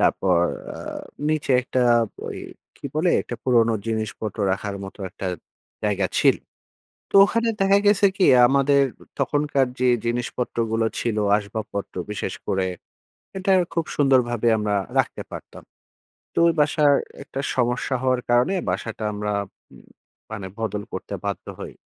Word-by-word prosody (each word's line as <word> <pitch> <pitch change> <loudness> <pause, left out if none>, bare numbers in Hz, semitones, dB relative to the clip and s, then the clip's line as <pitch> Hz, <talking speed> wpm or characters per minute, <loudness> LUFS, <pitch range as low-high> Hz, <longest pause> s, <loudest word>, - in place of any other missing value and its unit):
তারপর 90 -3 +3 0.4
আ - - -8 0.5
নিচে 155 -3 0
একটা 130 0 0 0.4
ওই - - -5 0.4
কি - - -7
বলে? 170 +3 +2
একটা 120 - -6
পুরনো 115 -3 +4
জিনিসপত্র 110 -1 -3
রাখার 100 +1 -3
মতো 95 - -10
একটা 100 -1 -6 0.6
জায়গা 100 -2 +1
ছিল। - - +5 0.7
তো - - -24
ওখানে 230 +2 0
দেখা 195 +1 +5
গেছে 205 0 +5
কি 190 - +3 0.2
আমাদের 140 +1 +4 0.4
তখনকার 145 -2 +1
যে 125 - +3 0.2
জিনিসপত্রগুলো 115 -1 -1
ছিল 115 -3 -1 0.2
আসবাবপত্র। 100 -1 -5 0.2
বিশেষ 105 - -3
করে 95 -1 0 0.7
এটার 190 -1 +3
খুব 165 -2 0
সুন্দরভাবে 125 -5 +3
আমরা 105 -1 0 0.2
রাখতে - - 0
পারতাম। - - -9 0.7
তো - - 0
ওই 165 - +3
বাসায় 145 -1 +4 0.3
একটা 135 - -7 0.2
সমস্যা 125 +1 0
হওয়ার 130 -1 +1
কারণে 125 +11 +3
বাসাটা 110 +4 -3
আমরা 105 0 -2 0.4
উম - - -16 0.5
মানে 100 -3 -5
বদল 105 -2 -2
করতে - - -6
বাধ্য - - -4
হই। - - -7
120 Hz, 135 wpm, -23 LUFS, 105-145 Hz, 0.7 s, ছিল